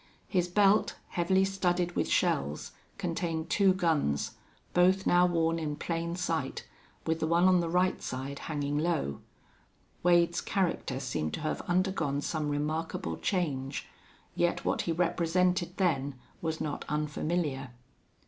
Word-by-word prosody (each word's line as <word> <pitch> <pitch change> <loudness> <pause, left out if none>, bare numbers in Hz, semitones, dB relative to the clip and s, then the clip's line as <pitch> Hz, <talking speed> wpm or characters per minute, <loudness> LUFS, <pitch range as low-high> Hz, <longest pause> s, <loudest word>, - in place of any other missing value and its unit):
His 180 -3 +1
belt, 200 +3 +3
heavily 190 +2 +2
studded 180 -2 0
with - - 0
shells, 70 +2 0 0.3
contained 165 -3 -2
two 200 -2 +5
guns, 160 - +1 0.4
both 185 +2 +4
now 180 0 +5
worn 165 -1 +1
in 150 -2 -2
plain 170 +2 -2
sight, 165 -6 -2 0.4
with 160 0 0
the 160 - 0
one 170 +2 +4
on 185 -1 +5
the 170 -1 -1
right 180 +2 +2
side 135 +2 -4
hanging 145 -1 -1
low. 155 - -1 0.8
Wade's 175 0 +4
character 170 -8 -1
seemed 80 - -2
to - - -7
have 155 - -2
undergone 175 -6 +1
some 155 -1 -2
remarkable 150 - -2
change, 140 -8 -1 0.5
yet 175 0 0
what - - +1
he - - +3
represented 175 +2 +1
then 145 -7 +1 0.3
was 160 -1 -2
not 150 -2 -3
unfamiliar. 150 -2 -1
165 Hz, 135 wpm, -30 LUFS, 150-180 Hz, 0.8 s, two